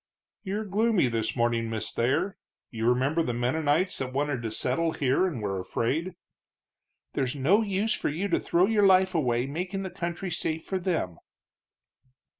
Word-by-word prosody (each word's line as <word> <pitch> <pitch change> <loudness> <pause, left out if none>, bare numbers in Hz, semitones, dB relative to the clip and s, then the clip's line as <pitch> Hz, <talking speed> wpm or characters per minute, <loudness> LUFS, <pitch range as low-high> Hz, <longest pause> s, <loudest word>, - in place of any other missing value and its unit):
"You're 210 +2 -3
gloomy 210 - +2
this 115 -1 -1
morning, 115 -1 +1
Miss 110 -2 -3
Thayer. 140 +11 0 0.4
You 115 -1 0
remember 135 +7 +2
the 120 -7 -1
Mennonites 150 +8 +1
that 130 -1 -3
wanted 140 -2 -1
to 115 - -3
settle 130 +9 0
here 140 +7 +2
and 130 -12 -4
were 95 -2 -1
afraid?" 160 - -2 1.0
"There's 130 0 -1
no 160 +11 +3
use 205 +1 0
for - - -1
you 170 +7 -2
to - - +2
throw 175 +2 +3
your 205 -1 +4
life 185 0 +5
away 125 -7 +1
making 180 +7 -3
the 190 - -5
country 175 +1 -4
safe 160 -1 -2
for 190 - -2
them." 165 - -2
160 Hz, 165 wpm, -27 LUFS, 125-185 Hz, 1.0 s, life